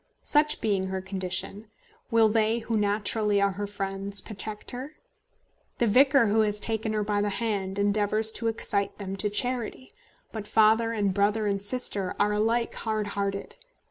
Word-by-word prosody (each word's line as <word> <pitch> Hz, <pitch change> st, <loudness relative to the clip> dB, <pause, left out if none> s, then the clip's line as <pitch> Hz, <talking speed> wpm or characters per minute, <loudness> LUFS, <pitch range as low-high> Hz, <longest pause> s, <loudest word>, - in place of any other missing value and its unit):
Such 300 Hz, 0 st, +2 dB
being 200 Hz, -4 st, 0 dB
her 190 Hz, 0 st, -3 dB
condition, 190 Hz, +2 st, -4 dB, 0.4 s
will 225 Hz, -1 st, +5 dB
they 220 Hz, +1 st, +2 dB
who 230 Hz, -1 st, -3 dB
naturally 210 Hz, 0 st, +1 dB
are 200 Hz, 0 st, +2 dB
her 205 Hz, +2 st, -4 dB
friends 195 Hz, 0 st, -3 dB
protect 215 Hz, 0 st, -5 dB
her? 260 Hz, +5 st, -7 dB, 0.8 s
The 240 Hz, -, +2 dB
vicar 265 Hz, +4 st, +5 dB
who 220 Hz, +1 st, +3 dB
has 210 Hz, -1 st, 0 dB
taken 220 Hz, 0 st, -1 dB
her 210 Hz, -1 st, 0 dB
by 205 Hz, 0 st, 0 dB
the 205 Hz, -, 0 dB
hand 200 Hz, -2 st, -2 dB
endeavours 205 Hz, +2 st, +2 dB
to 230 Hz, -, -3 dB
excite 205 Hz, -3 st, 0 dB
them 195 Hz, -2 st, -5 dB
to 210 Hz, +2 st, 0 dB
charity; 250 Hz, -, -4 dB, 0.4 s
but 215 Hz, -2 st, -6 dB
father, 220 Hz, +2 st, +4 dB
and 205 Hz, -4 st, 0 dB
brother, 205 Hz, +2 st, +1 dB
and 200 Hz, -1 st, -1 dB
sister 205 Hz, -3 st, +1 dB
are 205 Hz, +1 st, +3 dB
alike 225 Hz, +3 st, 0 dB
hard 215 Hz, -2 st, -2 dB
hearted. 200 Hz, 0 st, -3 dB
210 Hz, 165 wpm, -27 LUFS, 200-225 Hz, 0.8 s, will